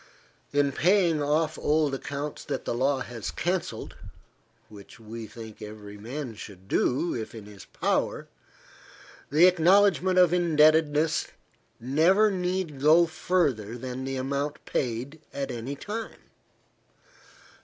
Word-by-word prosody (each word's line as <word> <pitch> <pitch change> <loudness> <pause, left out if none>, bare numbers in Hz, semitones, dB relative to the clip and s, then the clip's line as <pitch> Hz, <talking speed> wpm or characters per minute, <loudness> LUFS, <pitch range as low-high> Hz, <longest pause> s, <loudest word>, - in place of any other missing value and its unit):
In 145 -1 +2
paying 170 0 +3
off 155 +2 0
old 150 -1 +1
accounts 140 +2 -5
that - - -4
the - - -1
law 135 +3 +1
has 115 -4 -5
cancelled, 180 +1 -3 0.7
which 105 0 -14
we 110 0 -8
think 110 -1 -11
every 105 -1 -9
man 120 +4 -6
should 95 -3 -11
do, 135 - +1
if 115 -1 -5
in 110 -2 -9
his 105 -2 -12
power, - - -1 1.0
the 155 +5 +6
acknowledgment 185 +1 +4
of 180 -2 +5
indebtedness 155 -2 +3 0.5
never 170 - +3
need 180 -5 -2
go 160 +4 +6
further 160 - -1
than 130 +1 -6
the 135 0 -3
amount 140 +3 -3
paid 130 +5 -3
at 140 -1 -3
any 120 +4 -5
time. 215 +9 -7
145 Hz, 125 wpm, -27 LUFS, 120-170 Hz, 1.0 s, the